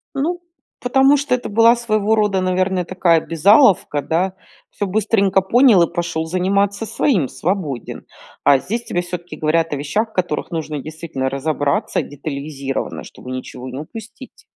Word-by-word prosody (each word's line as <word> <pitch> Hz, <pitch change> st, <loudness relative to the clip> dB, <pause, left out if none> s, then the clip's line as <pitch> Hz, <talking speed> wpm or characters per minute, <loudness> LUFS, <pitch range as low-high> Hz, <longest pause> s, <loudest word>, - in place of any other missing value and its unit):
Ну 330 Hz, +6 st, -1 dB, 0.4 s
потому 270 Hz, +3 st, +4 dB
что 285 Hz, -2 st, -1 dB
это 250 Hz, -, -6 dB
была 230 Hz, +3 st, +5 dB
своего 220 Hz, -2 st, +1 dB
рода, 205 Hz, -3 st, +1 dB
наверно, 185 Hz, 0 st, 0 dB
такая 175 Hz, -2 st, +2 dB
обязаловка, 165 Hz, -, +4 dB
да? 175 Hz, +6 st, 0 dB, 0.4 s
Всё 205 Hz, -, -3 dB
быстренько 200 Hz, -1 st, +2 dB
понял, 225 Hz, 0 st, +5 dB
и 170 Hz, -, +2 dB
пошёл 170 Hz, -2 st, -2 dB
заниматься 200 Hz, +5 st, 0 dB
своим, 210 Hz, -, +1 dB
свободен. 155 Hz, -, -4 dB, 0.4 s
А 140 Hz, -2 st, +5 dB
здесь 230 Hz, -, -4 dB
тебе 175 Hz, -, -1 dB
всё-таки 175 Hz, 0 st, -7 dB
говорят 160 Hz, +1 st, 0 dB
о 145 Hz, -, -1 dB
вещах, 210 Hz, +11 st, -1 dB
в -, -, -27 dB
которых 175 Hz, -5 st, -2 dB
нужно 155 Hz, -3 st, -3 dB
действительно 155 Hz, -3 st, -4 dB
разобраться 140 Hz, +1 st, -1 dB
детализировано, 140 Hz, -1 st, -5 dB
чтобы 125 Hz, -, -11 dB
ничего 130 Hz, 0 st, -7 dB
не 130 Hz, +2 st, -6 dB
упустить. 225 Hz, -, -11 dB
180 Hz, 150 wpm, -19 LUFS, 155-215 Hz, 0.4 s, была